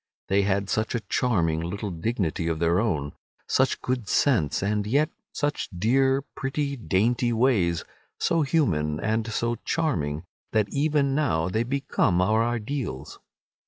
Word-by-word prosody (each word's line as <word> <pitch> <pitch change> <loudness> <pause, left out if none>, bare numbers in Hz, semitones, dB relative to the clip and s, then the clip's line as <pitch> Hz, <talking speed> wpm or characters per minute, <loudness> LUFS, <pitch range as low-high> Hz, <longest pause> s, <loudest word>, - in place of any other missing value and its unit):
They 100 +1 +4
had 100 0 0
such 110 +3 -1
a 120 - -1
charming 85 -12 +1
little 100 +4 -4
dignity 85 -2 -2
of 80 -1 0
their 85 +2 +2
own, 75 -10 -1 0.3
such - - +1
good 125 -4 -2
sense, 105 - +2
and 105 0 0
yet 145 +7 +2 0.2
such 145 0 -2
dear, 135 +7 +2
pretty, 140 +1 -3
dainty 120 +2 +1
ways, 110 -9 +2 0.3
so 165 -1 +1
human 80 - +1
and 110 +3 -1
so 115 +1 -1
charming, 80 - -1 0.3
that 105 -2 +2
even 145 0 +1
now 95 - +1
they 110 +4 0
become 120 -7 +1
our 110 +5 +3
ideals. 120 - -3
110 Hz, 140 wpm, -26 LUFS, 90-135 Hz, 0.3 s, They